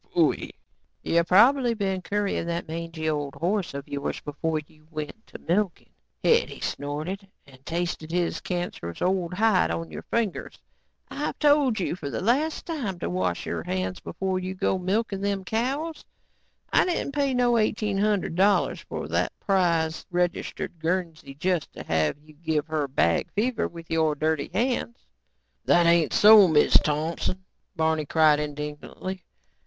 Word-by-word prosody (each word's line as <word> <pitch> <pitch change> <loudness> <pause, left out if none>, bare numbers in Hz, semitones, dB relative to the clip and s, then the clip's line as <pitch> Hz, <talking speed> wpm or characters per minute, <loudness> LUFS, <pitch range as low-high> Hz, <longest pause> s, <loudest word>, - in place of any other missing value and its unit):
"You 170 0 +3
probably 240 +6 +5
been 195 -3 -1
currying 200 -3 -1
that 170 0 -3
mangey 165 0 -4
old 145 -3 -2
horse 185 -2 -1
of 140 0 -6
yours 140 0 -3
before 155 +2 -2
you 155 0 -24
went 155 +8 -7
to - - -10
milking," 185 +1 -1 0.3
Hetty - - +2
snorted, 155 +8 -4 0.2
"and 130 -1 -18
tasted 170 -2 -3
his 175 -1 0
cancerous 175 - -4
old 180 -1 0
hide 210 - +3
on 85 -1 -3
your 75 - -6
fingers. 230 -5 -2 0.5
I've 295 - -3
told 290 -6 +3
you 175 - -1
for 150 -6 -6
the - - -3
last 285 +9 +1
time 255 - -3
to 170 - -3
wash 90 -1 -1
your 85 -1 -3
hands 95 +1 -3
before 190 +1 -2
you 185 +1 -4
go 190 0 0
to - - -9
milking 200 +1 0
them 200 -1 -1
cows. 270 - -2 0.7
I - - +6
didn't 350 -5 -1
pay 280 -2 +1
no 240 -1 +3
eighteen 215 -2 0
hundred 205 -5 +1
dollars 195 +4 +3
for - - -6
that - - -1
prize, 170 -4 +1
registered 175 -1 -2
Guernsey 165 -4 -2
just 175 +1 -1
to - - -8
have 80 - 0
you 155 0 -17
give 155 -1 -1
her 155 -3 -1
bag 85 -11 +1
fever 230 +3 0
with 165 -1 -11
your 160 -2 +2
dirty 155 -1 0
hands." 225 - -1 0.7
"That 175 0 +5
ain't 170 -2 +4
so, 210 -2 +8
Miz 155 -3 +3
Thompson," 165 +5 +1 0.3
Barney 160 -2 +1
cried 155 -1 +4
indignantly. 150 +5 -5
175 Hz, 155 wpm, -26 LUFS, 155-205 Hz, 0.7 s, so